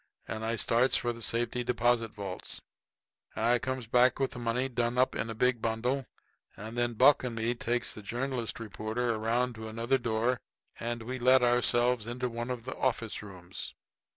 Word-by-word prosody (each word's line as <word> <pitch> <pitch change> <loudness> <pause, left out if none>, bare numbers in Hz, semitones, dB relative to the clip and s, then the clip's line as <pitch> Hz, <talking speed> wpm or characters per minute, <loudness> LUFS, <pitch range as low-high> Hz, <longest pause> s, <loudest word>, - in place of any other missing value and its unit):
And 110 0 -4
I 115 +1 0
starts 120 +3 +3
for 120 0 -1
the 115 - -10
safe 115 +1 0
deposit 120 -2 +1
vaults. 95 -3 -4 0.8
I 120 +2 +3
comes 130 -1 -3
back 125 +2 +4
with 135 - +1
the 125 - -7
money 120 +2 0
done 120 -1 -1
up 130 +1 +3
in 115 - -2
a 115 - -4
big 125 0 +2
bundle, 120 +3 -1 0.5
and 110 +3 -7
then 120 -1 0
Buck 130 +5 +6
and 125 -2 -3
me 115 +1 0
takes 120 0 -1
the 110 - -8
journalist 120 +2 -2
reporter 115 +2 -2
around 115 +3 0
to 110 0 -7
another 115 +4 0
door 120 0 0 0.4
and 120 0 -3
we 130 +3 -4
let 130 +1 +5
ourselves 120 -1 +3
into 125 +1 -2
one 120 +1 -4
of 125 -2 -3
the 130 - -5
office 115 -4 -1
rooms. 95 -3 -8
120 Hz, 180 wpm, -30 LUFS, 115-125 Hz, 0.8 s, Buck